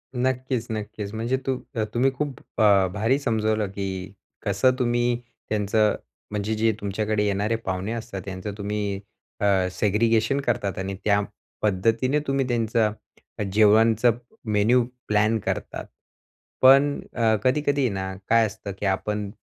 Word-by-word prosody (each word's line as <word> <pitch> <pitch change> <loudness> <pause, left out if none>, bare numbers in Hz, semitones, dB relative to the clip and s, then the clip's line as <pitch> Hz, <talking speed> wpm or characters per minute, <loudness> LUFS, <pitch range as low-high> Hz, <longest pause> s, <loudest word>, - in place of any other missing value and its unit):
नक्कीच, 125 -1 -1
नक्कीच. 105 -1 -5
म्हणजे 115 +4 -1
तू 130 -1 0 0.4
तुम्ही 130 +3 +3
खूप 140 -2 -3 0.2
अ, 100 -3 +5
भारी 115 +6 +2
समजवलं, 110 -5 0
की 95 -1 -5 0.3
कसं 105 +6 +3
तुम्ही 120 0 +1 0.3
त्यांचं 105 0 +2 0.4
म्हणजे 105 +1 -2
जे 110 +1 +2
तुमच्याकडे 105 +1 -1
येणारे 105 +3 0
पाहुणे 95 -1 -3
असतात 115 -4 -5
त्यांचं 95 +1 -5
तुम्ही 100 -1 -2 0.4
अ, 95 -2 +2
सेग्रीगेशन 110 +7 +2
करतात 115 -7 -1
आणि 95 +1 -3
त्या 100 -1 +3 0.4
पद्धतीने 115 +7 +1
तुम्ही 135 -1 +1
त्यांचं 115 -2 +1 0.5
अ, 105 - 0
जेवणाचं 110 +2 +5 0.3
मेनू 110 +4 +4 0.2
प्लॅन 110 +1 +3
करता. - - -3 0.8
पण 140 +2 +6
अ, 115 -2 +3
कधी-कधी 140 0 +2
ना 95 -1 -4 0.2
काय 115 0 +5
असतं, 100 -1 -6
की 105 - -3
आपण 105 +1 -1
110 Hz, 130 wpm, -24 LUFS, 100-120 Hz, 0.8 s, पण